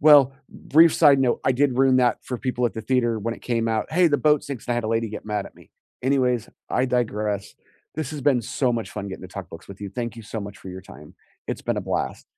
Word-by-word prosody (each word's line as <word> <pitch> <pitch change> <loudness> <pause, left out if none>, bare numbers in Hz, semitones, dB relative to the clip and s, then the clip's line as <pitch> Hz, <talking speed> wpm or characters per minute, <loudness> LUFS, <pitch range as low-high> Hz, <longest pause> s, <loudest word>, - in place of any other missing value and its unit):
Well, 145 -3 +7 0.2
brief 165 +3 +4
side 145 -4 +6
note, 125 -2 +1
I 130 - +4
did 130 -1 +1
ruin 130 -1 +4
that 125 -2 +3
for 125 - -4
people 125 -1 0
at 115 - -3
the 110 - -4
theater 120 -1 +1
when 115 +2 -3
it - - -16
came 115 -2 0
out, 110 -1 -1
"Hey, 180 +1 +5
the 145 - +2
boat 150 -1 +3
sinks," 140 -4 -7
and 120 - 0
I - - 0
had 120 - -1
a - - -1
lady 115 0 0
get 105 - -7
mad 105 -2 -2
at - - -14
me. - - -19 0.3
Anyways, 125 -3 +1 0.2
I 125 - +2
digress, 105 -5 -1 0.4
this 155 -3 -3
has 150 - -5
been 135 -3 +3
so 125 +3 0
much 115 -2 -3
fun 100 -1 -5
getting 95 - -8
to 95 - -8
talk 95 -2 -8
books 80 - -11
with 100 0 -11
you. 100 -2 -5
Thank 120 +1 -4
you 115 - -8
so 110 +1 -5
much 100 -1 -8
for 95 - -10
your 95 - -7
time. 75 -5 -14 0.3
It's - - -4
been - - -1
a - - 0
blast. - - -3
120 Hz, 270 wpm, -24 LUFS, 105-135 Hz, 0.4 s, Well